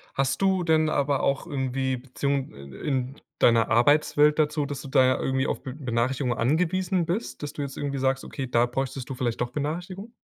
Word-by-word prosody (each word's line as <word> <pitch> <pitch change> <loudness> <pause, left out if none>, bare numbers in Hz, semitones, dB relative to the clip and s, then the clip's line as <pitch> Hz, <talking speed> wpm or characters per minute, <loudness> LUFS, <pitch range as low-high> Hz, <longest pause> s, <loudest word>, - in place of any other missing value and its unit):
Hast 135 +6 0
du 190 -2 +2
denn 160 -1 +3
aber 140 -2 +1
auch 140 +2 0
irgendwie 130 -3 -1
Beziehung, 135 +2 -2
äh, 70 - -12
äh, - - -6
in 130 -1 -1 0.2
deiner 115 -1 +4
Arbeitswelt 145 +5 +4
dazu, 150 -1 +1
dass 140 -2 -5
du - - -9
da 130 -1 +4
irgendwie 130 +1 0
auf - - -3
Be 130 - -6
Benachrichtigungen 125 -1 -1
angewiesen 175 +7 +1
bist, 180 +2 -3
dass 145 -1 -4
du 145 - -5
jetzt 135 -1 -5
irgendwie 140 -1 -3
sagst, 135 0 0
okay, 135 - -5
da 120 0 +3
bräuchtest 130 +1 -4
du 135 - -4
vielleicht 120 -2 -2
doch 120 0 -1
Benachrichtigung? 175 - -4
135 Hz, 200 wpm, -26 LUFS, 130-150 Hz, 0.2 s, deiner